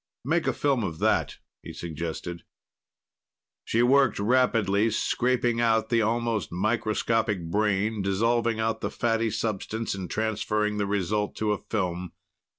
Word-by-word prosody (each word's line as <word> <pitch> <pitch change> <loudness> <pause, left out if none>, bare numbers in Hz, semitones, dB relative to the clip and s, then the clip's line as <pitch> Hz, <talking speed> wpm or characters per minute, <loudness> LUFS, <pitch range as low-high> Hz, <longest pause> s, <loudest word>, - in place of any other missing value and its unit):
"Make 165 +5 +1
a - - +2
film 135 -5 +1
of 85 -5 -3
that," - - +1 0.2
he - - -9
suggested. 85 +1 -5 1.2
She 115 +2 +1
worked 135 -1 +4
rapidly, 110 -2 +2
scraping 120 +1 +1
out 110 -1 +2
the 115 -1 +3
almost 115 -3 0
microscopic 110 -1 0
brain, 105 +1 +1
dissolving 115 +4 +1
out 110 0 -1
the - - -1
fatty 115 -1 0
substance, 110 +1 -2
and 95 -2 -5
transferring 105 -1 -1
the 100 -1 0
result 105 +1 -1
to 110 -1 0
a 105 - -1
film. 90 -4 -3
110 Hz, 135 wpm, -26 LUFS, 100-115 Hz, 1.2 s, worked